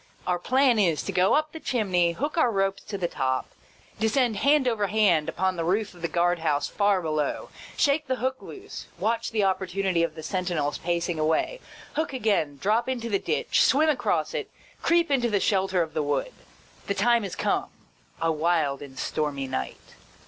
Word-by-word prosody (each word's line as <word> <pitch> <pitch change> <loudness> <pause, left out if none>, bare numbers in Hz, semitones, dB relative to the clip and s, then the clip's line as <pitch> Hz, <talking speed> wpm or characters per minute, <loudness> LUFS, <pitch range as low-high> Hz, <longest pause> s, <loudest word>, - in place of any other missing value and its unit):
Our 180 -1 0
plan 255 +2 +3
is, 170 -7 +2
to - - -3
go 180 +1 +3
up 305 0 +1
the 320 - -8
chimney, 185 - +1
hook 290 - -3
our 320 -7 +3
ropes 195 -2 0
to 200 - -5
the 180 -2 -1
top, 130 -4 -2 0.5
descend 225 0 +1
hand 285 -2 +3
over 215 -4 +1
hand 190 -7 +3
upon 185 -1 -1
the 165 - -1
roof 200 +5 0
of 175 - -15
the 170 - 0
guard 175 0 +1
house 150 -3 0
far 200 -3 +1
below, 155 -2 -2 0.3
shake 290 +1 +2
the 260 - 0
hook 260 +1 -2
loose, 405 +1 -9
watch 230 +1 -1
the 215 -2 0
opportunity 190 -1 0
of 165 -2 -1
the 160 - -8
sentinel's 175 -6 -2
pacing 170 -1 -1
away, 160 - 0 0.3
hook 315 -2 -2
again, 200 - 0
drop 225 +5 +1
into 235 -3 -3
the 200 -3 +1
ditch, - - 0
swim 310 +4 +4
across 295 - 0
it, 455 -4 -3 0.3
creep 335 -2 +2
into 245 -4 +2
the 205 -2 +1
shelter 190 -2 +1
of 160 - -8
the 155 - 0
wood. 145 - -1 0.5
The 200 - -1
time 235 +3 +3
is 195 - -5
come - - 0 0.3
— - - -33
a 165 0 +1
wild 155 -3 +1
and 135 -2 -10
stormy 145 -2 -2
night. 65 - -4
195 Hz, 190 wpm, -26 LUFS, 165-240 Hz, 0.5 s, swim